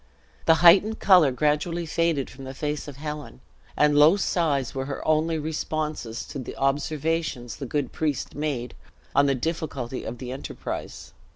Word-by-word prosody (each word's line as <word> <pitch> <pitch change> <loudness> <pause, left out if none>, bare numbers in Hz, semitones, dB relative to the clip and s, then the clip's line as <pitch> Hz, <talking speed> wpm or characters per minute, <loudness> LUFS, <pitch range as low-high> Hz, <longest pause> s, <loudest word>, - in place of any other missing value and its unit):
The 160 - +7
heightened 200 +6 +7
color 180 -8 +6
gradually 150 +6 0
faded 165 -3 0
from 135 +1 -11
the 130 0 -7
face 150 +1 -3
of 145 - -8
Helen, 150 - -7 0.4
and 150 0 +4
low 150 +6 +7
sighs 150 -9 0
were 135 0 -3
her 140 - -5
only 155 +1 +2
responses 155 -5 -3
to 140 - -7
the 130 - -7
observations 145 -2 -1
the 135 - -5
good 145 0 -2
priest 150 -4 -2
made 140 -5 -3 0.4
on 140 +1 +4
the 135 - +2
difficulty 135 -3 -3
of 120 - -6
the 125 0 -6
enterprise. 130 - -6
150 Hz, 160 wpm, -25 LUFS, 135-160 Hz, 0.4 s, The